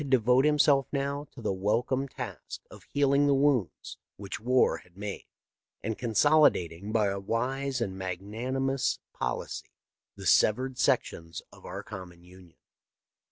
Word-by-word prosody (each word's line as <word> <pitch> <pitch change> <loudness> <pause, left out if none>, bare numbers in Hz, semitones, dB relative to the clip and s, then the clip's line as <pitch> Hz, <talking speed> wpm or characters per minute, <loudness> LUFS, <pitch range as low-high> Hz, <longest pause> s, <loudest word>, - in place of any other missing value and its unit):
devote 125 +1 +4
himself 145 -3 +4
now 140 +1 -2
to 120 - -12
the 105 - 0
welcome 120 +8 0
task - - -7
of - - -12
healing 140 0 +2
the 140 - +4
wounds 135 -8 0 0.2
which 100 0 -6
war 125 +3 +3
had 90 0 -19
made, 100 0 -6 0.6
and 110 +1 -2
consolidating 110 - +3
by 110 -2 +2
a 100 0 -1
wise 130 +6 -1
and 100 -5 -2
magnani 100 +8 -4
mous 135 -1 0 0.2
policy - - -4 0.5
the - - -9
severed 130 +4 +3
sections 80 -1 0
of - - -13
our - - -6
common 90 -2 -10
Union. 90 -1 -17
120 Hz, 140 wpm, -29 LUFS, 95-135 Hz, 0.6 s, devote